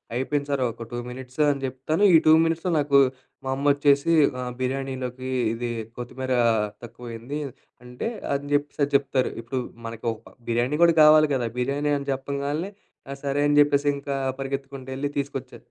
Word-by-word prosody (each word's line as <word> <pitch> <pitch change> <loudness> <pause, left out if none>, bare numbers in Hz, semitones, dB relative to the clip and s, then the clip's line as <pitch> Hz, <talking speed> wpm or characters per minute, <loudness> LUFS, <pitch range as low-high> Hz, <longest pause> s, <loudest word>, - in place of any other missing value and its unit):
అయిపోయింది 140 +3 -1
సారు 135 -2 +1
ఒక 115 0 -9
2 120 - -2
మినిట్స్ 130 +3 -6
అని 140 -1 -1
జెప్తాను, 135 +8 -1
ఈ - - +10
2 155 - +8
మినిట్స్‌లో 165 +2 -1
నాకు 140 -1 +4 0.5
మా 130 - -1
అమ్మొచ్చేసి 145 +2 +3 0.3
"ఆహ్, 125 0 -4
బిర్యానీలోకి 130 -1 -3 0.2
ఇది 120 +1 -3 0.3
కొత్తిమీర 130 +2 -4 0.5
తక్కువ 120 +1 -12
అయింది" 120 +6 -5 0.5
అంటే, 125 - -4 0.2
అని 140 +1 -3
జెప్పిసది 145 0 -1
జెప్తారు. 135 -2 +1
ఇప్పుడు 130 +3 -3 0.3
మనకు 115 0 -6
ఒక 110 - -16
బిర్యానీ 120 +5 +1
గుడా 170 -1 +5
కావాలి 155 0 +7
గదా! 120 -3 -1
బిర్యానీ 140 +4 0
అని 140 - -8
చెప్పంగాల్నే, 140 +6 -3 0.4
ఆ! - - -3
సరే 140 0 0
అని 145 - +3
జెప్పేసి 145 0 +3
ఇంకా 140 0 -3 0.2
పరిగెత్తుకుంటూ 135 -1 -5
వెళ్లి 140 +2 -2
తీసుకొచ్చా 135 -2 -5
140 Hz, 155 wpm, -25 LUFS, 130-145 Hz, 0.5 s, ఈ